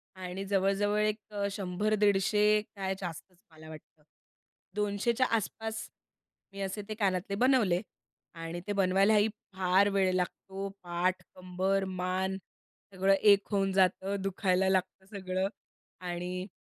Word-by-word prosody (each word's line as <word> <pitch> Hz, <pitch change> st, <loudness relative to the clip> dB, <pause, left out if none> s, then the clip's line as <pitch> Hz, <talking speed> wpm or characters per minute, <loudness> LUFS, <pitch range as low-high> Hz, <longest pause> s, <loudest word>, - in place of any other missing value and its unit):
आणि 185 Hz, +1 st, -5 dB
जवळ-जवळ 200 Hz, +1 st, +1 dB
एक 215 Hz, +1 st, +1 dB
अ, 200 Hz, -1 st, -1 dB
100-150 210 Hz, +1 st, +2 dB
काय 190 Hz, -1 st, -2 dB
जास्तच 175 Hz, 0 st, -7 dB
मला 155 Hz, 0 st, -13 dB
वाटतं 155 Hz, -1 st, -13 dB, 0.7 s
200 210 Hz, +3 st, 0 dB
च्या 255 Hz, +2 st, +2 dB
आसपास 220 Hz, +1 st, -4 dB, 0.6 s
मी 200 Hz, -, -6 dB
असे 195 Hz, +2 st, -3 dB
ते -, -, -2 dB
कानातले 195 Hz, -2 st, 0 dB
बनवले. 220 Hz, -7 st, +3 dB, 0.5 s
आणि 165 Hz, +1 st, -5 dB
ते -, -, -1 dB
बनवायलाही 200 Hz, +3 st, +4 dB, 0.3 s
फार 190 Hz, +2 st, +3 dB
वेळ 195 Hz, -2 st, +2 dB
लागतो, 190 Hz, +2 st, -3 dB, 0.2 s
पाठ 175 Hz, +1 st, 0 dB
कंबर 185 Hz, +2 st, -1 dB
मान 190 Hz, +1 st, -1 dB, 0.6 s
सगळं 190 Hz, +1 st, +3 dB
एक 200 Hz, 0 st, +5 dB
होऊन 195 Hz, -1 st, +1 dB
जातं, 190 Hz, +1 st, +2 dB
दुखायला 190 Hz, -1 st, +1 dB
लागतं 190 Hz, 0 st, -1 dB
सगळं 185 Hz, 0 st, -1 dB, 0.5 s
आणि 180 Hz, +1 st, -4 dB
195 Hz, 125 wpm, -30 LUFS, 185-205 Hz, 0.7 s, एक